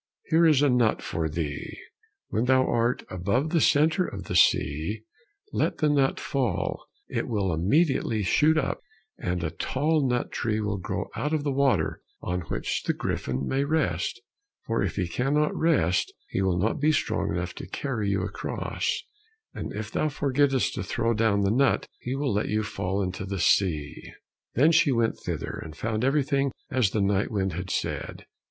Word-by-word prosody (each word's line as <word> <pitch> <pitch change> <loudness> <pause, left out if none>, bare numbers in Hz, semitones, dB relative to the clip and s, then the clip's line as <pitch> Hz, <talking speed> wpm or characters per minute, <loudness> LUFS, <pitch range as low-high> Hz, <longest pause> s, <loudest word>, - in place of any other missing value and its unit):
Here 165 +1 +6
is 145 -3 +4
a 145 - +5
nut 120 -3 +3
for 80 -1 -2
thee, 75 -2 -4 0.5
when 110 +4 0
thou 130 0 +4
are 120 +1 +1
above 100 - 0
the 165 - +3
center 160 +5 +4
of 100 - -5
the - - -4
sea, 80 +10 +2 0.5
let - - 0
the 155 - +2
nut 140 -2 +2
fall, 130 -5 -2 0.2
it - - -2
will 100 -5 0
immediately 110 - +2
shoot 155 - +3
up, - - -1 0.4
and 90 -1 -2
a 80 - -1
tall 150 - 0
nut 125 0 -1
tree 110 -2 -1
will 105 -2 -2
grow - - -4
out 150 +7 -1
of 150 - -1
the 145 - 0
water 135 0 +1 0.2
on 90 0 -2
which - - -2
the - - 0
griffin 65 +1 -2
may 135 +1 +1
rest; 155 +2 0 0.5
for 115 0 0
if 95 -5 -1
he 95 -3 -1
cannot 140 - +1
rest, 135 - +2 0.2
he 95 - -1
will 95 -2 +1
not 105 +5 0
be 150 +2 +3
strong 150 - 0
enough 90 0 -3
to - - -8
carry 110 -1 -2
you 100 -2 0
across, 100 +1 -3 0.5
and - - -5
if 105 +1 -5
thou 155 - 0
forgettest 140 -2 +1
to - - -3
throw 115 0 0
down 110 -2 +2
the 100 0 +2
nut, 135 +4 +2
he 125 +2 -3
will 140 -3 0
let 105 - 0
you 110 +1 +1
fall 100 -1 -2
into 95 +1 -4
the 100 0 -4
sea." 80 -4 +1 0.5
Then 150 +7 +5
she 155 -3 +4
went 115 -2 +1
thither, - - -4
and 80 -2 -9
found 110 0 -2
everything 140 0 +2 0.2
as 125 -6 +3
the 105 - -1
night 100 0 +1
wind 95 -4 -1
had 90 +3 -5
said. - - -3
115 Hz, 180 wpm, -26 LUFS, 95-140 Hz, 0.5 s, Here